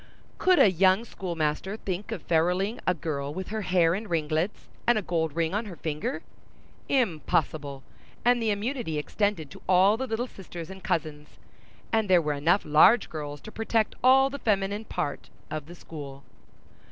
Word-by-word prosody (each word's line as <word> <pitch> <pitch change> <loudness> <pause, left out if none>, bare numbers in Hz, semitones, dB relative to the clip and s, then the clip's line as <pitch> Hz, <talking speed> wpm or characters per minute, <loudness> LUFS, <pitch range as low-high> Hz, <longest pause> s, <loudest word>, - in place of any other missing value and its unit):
Could 370 -1 +4
a 200 - +6
young 190 +5 +3
schoolmaster 175 0 -3
think 195 +1 -4
of 200 -8 -5
feruling 180 +7 +1
a 180 - +3
girl 145 -3 -3
with 185 +4 -6
her 220 0 -3
hair 180 -3 +3
in 210 +4 -4
ringlets 160 +2 -1 0.2
and 240 -1 +5
a 215 - -1
gold 160 -4 -1
ring 165 0 0
on 215 +3 -1
her 190 -4 -8
finger? 155 0 -3 0.7
Impossible—and 160 - -1
the 225 - +1
immunity 210 - -2
extended 165 -1 -1
to - - -12
all 190 +4 +5
the 260 +2 -3
little 230 +1 -1
sisters 175 -7 -9
and 190 0 -11
cousins; 150 -2 -3 0.6
and 220 -3 +2
there 180 -1 +6
were 150 -2 -1
enough 165 +7 +2
large 175 +9 +5
girls 145 -2 -5
to 215 - -10
protect 225 0 0
all 270 +1 +6
the 280 - -6
feminine 205 -1 0
part 145 - -4 0.2
of 155 -1 -4
the 175 - -10
school. 140 -5 -9
185 Hz, 165 wpm, -27 LUFS, 155-215 Hz, 0.7 s, a